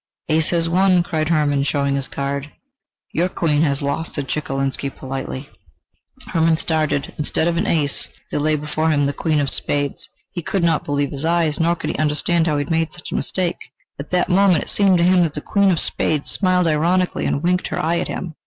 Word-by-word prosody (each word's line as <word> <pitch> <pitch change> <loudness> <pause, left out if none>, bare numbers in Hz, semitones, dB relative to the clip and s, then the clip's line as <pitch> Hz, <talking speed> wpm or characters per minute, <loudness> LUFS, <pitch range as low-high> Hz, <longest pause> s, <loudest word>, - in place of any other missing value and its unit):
"Ace 155 0 +2
has 165 -1 +1
won!" 180 +1 +3
cried 155 -2 -1
Hermann, 150 -4 +2
showing 140 0 0
his 140 -1 -1
card. 140 +1 -4 0.6
"Your 175 +3 +1
queen 155 -4 +1
has 140 -3 +1
lost," 140 +4 -3
said 145 -2 -3
Chekalinsky, 135 -1 -2
politely. 135 0 -6 0.8
Hermann 165 -1 +3
started; 155 -3 -1
instead 155 +2 0
of 170 - +1
an 170 - 0
ace, 145 -4 0 0.2
there - - -1
lay 155 +1 +2
before 150 +2 -1
him 145 -2 +2
the 140 - 0
queen 155 +1 0
of 140 -2 +1
spades! 145 -1 -2 0.2
He 175 - -4
could 185 +2 -1
not 165 -2 +2
believe 145 -1 -1
his 140 0 -6
eyes, 165 -2 +1
nor 170 +1 +2
could - - -3
he - - -6
understand 155 +3 +1
how 150 -2 +1
he 145 - 0
had 145 - -8
made 165 -1 +1
such 175 - -8
a - - -2
mistake. 180 -2 -2 0.3
At 140 - -7
that 180 -1 +1
moment 185 -3 +4
it - - -7
seemed 195 -3 +4
to 170 - +2
him 180 +1 +5
that 165 -4 0
the - - -2
queen 200 +5 +2
of 175 -4 +2
spades 150 -2 -1
smiled 185 -2 +2
ironically 170 +4 +1
and 140 - -1
winked 180 +1 +1
her - - -4
eye 170 +2 +1
at - - -2
him. 175 -3 -5
160 Hz, 215 wpm, -20 LUFS, 145-170 Hz, 0.8 s, him